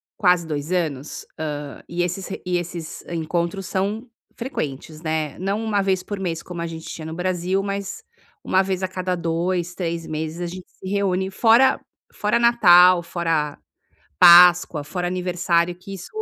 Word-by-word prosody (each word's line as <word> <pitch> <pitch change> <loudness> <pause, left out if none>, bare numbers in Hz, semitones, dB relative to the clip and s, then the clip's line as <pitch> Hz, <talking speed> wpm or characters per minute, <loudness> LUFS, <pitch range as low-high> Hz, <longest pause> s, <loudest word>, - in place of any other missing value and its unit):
quase 180 -3 +3
2 150 +1 -4
anos, 155 -6 -2
hã, 145 -2 -5
e 175 +1 -1
esses 180 +2 -4 0.2
e 180 -1 0
esses 170 -2 -6
encontros 170 +3 -2
são 205 +6 -2 0.3
frequentes, 155 - -5
né. 155 -2 -2
Não 200 +4 -2
uma 210 -3 +1
vez 190 -2 0
por 205 0 -6
mês 170 -4 -3
como 175 -2 -7
a 170 - -2
gente 160 -1 -8
tinha 155 - -7
no 160 0 -6
Brasil, 185 +1 -1
mas 200 -1 -4 0.4
uma 190 - +3
vez 190 -1 -2
a - - +1
cada 185 0 -2
2, 175 +1 -1
3 170 -2 -3
meses 155 +2 -4
a 175 - -2
gente 180 +1 -9
se 190 - -12
reúne. 190 -1 0
Fora 235 +6 +4 0.3
fora 210 +3 +1
Natal, 185 -7 +6
fora 165 -4 -2 0.6
Páscoa, 175 - +7
fora 180 +3 -3
aniversário, 175 -1 0
que 190 +2 -10
isso 190 -1 -8
180 Hz, 165 wpm, -22 LUFS, 165-190 Hz, 0.6 s, Páscoa